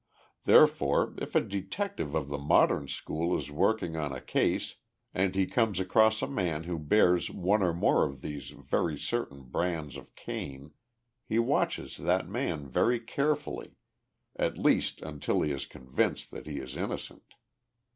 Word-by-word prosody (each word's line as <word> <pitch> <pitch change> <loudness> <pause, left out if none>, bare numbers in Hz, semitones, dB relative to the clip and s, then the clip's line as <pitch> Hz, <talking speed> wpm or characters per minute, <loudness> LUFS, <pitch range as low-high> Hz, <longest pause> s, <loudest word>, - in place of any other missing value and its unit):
Therefore, - - +5
if - - -6
a - - +6
detective 100 - -3
of 75 -3 -1
the 70 0 -3
modern 70 0 +3
school 85 +5 -1
is 75 - -6
working 85 +2 +1
on 75 -3 -2
a 65 - -5
case - - 0 0.4
and 95 0 +1
he 95 -1 +3
comes 110 -2 +1
across 110 +4 +3
a - - 0
man 90 - -1
who 85 -1 -3
bears 90 +2 +3
one 100 +4 +1
or 90 -2 +3
more 85 - +3
of 70 -2 -9
these 75 -2 -6
very 80 -3 -1
certain 70 - -3
brands 80 +1 -2
of 70 - -14
Cain, 70 +2 -6 0.6
he 110 - 0
watches 115 - 0
that 90 +2 +1
man 90 - -2
very 115 - +2
carefully 145 +5 -2 0.6
at - - -1
least - - +2
until 75 -2 -1
he 75 - 0
is 70 -1 -4
convinced 65 0 -2
that - - -9
he 75 -2 -4
is 65 -1 -6
innocent. - - -6
85 Hz, 155 wpm, -30 LUFS, 70-105 Hz, 0.6 s, a